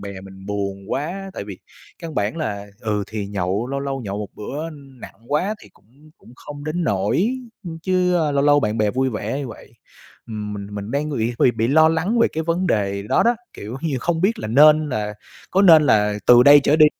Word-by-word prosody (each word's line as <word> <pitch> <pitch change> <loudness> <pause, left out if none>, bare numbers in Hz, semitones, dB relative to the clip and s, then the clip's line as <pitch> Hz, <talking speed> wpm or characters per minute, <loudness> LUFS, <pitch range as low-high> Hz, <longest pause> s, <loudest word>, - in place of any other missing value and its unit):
bè 100 -1 -7
mình 95 0 -13
buồn 100 -1 -4
quá, 185 +7 -4
tại - - -5
vì 100 -3 -9 0.4
căn 165 -2 -8
bản 105 +8 -1
là, 105 -10 -4
ừ, 105 -2 -1
thì 105 -2 -5
nhậu 100 +2 -2
lâu 140 +1 -3
lâu 135 -1 -3
nhậu 100 -3 -5
một 105 -1 -5
bữa 150 +9 -6
nặng 135 -4 -13
quá 180 +9 0
thì - - -14
cũng 140 +9 -23
cũng - - -18
không 145 0 -10
đến 165 +3 -2
nỗi, 135 - 0 0.4
chứ 185 -1 +1 0.2
lâu 140 0 +1
lâu 145 0 +5
bạn 110 -1 -1
bè 105 -1 +2
vui 130 +3 0
vẻ 110 +4 -3
như 140 -3 -5
vậy. 110 - -13 0.5
Ừm, 105 -2 -5
mình 100 -1 -6
mình 100 +1 -6
đang 145 +4 -1
ng 145 - -3 0.2
b - - 0
bị 115 +1 +1
lo 160 +3 +5
lắng 170 +9 0
về 230 - +4
cái 160 - -2
vấn 170 +3 -1
đề 100 - 0
đó 105 - +2
đó, 235 0 +2 0.2
kiểu 110 +5 -8
như, 150 -4 -2
không 165 +2 -1
biết 200 +6 +1
là 110 - -5
nên 150 +5 +5
là 105 -5 -3 0.4
có 195 +2 +3
nên 165 -5 +8
là 105 -7 +3
từ 120 0 +8
đây 145 +2 +8
trở 150 - +4
đi 155 -1 +7
135 Hz, 220 wpm, -21 LUFS, 105-155 Hz, 0.5 s, nên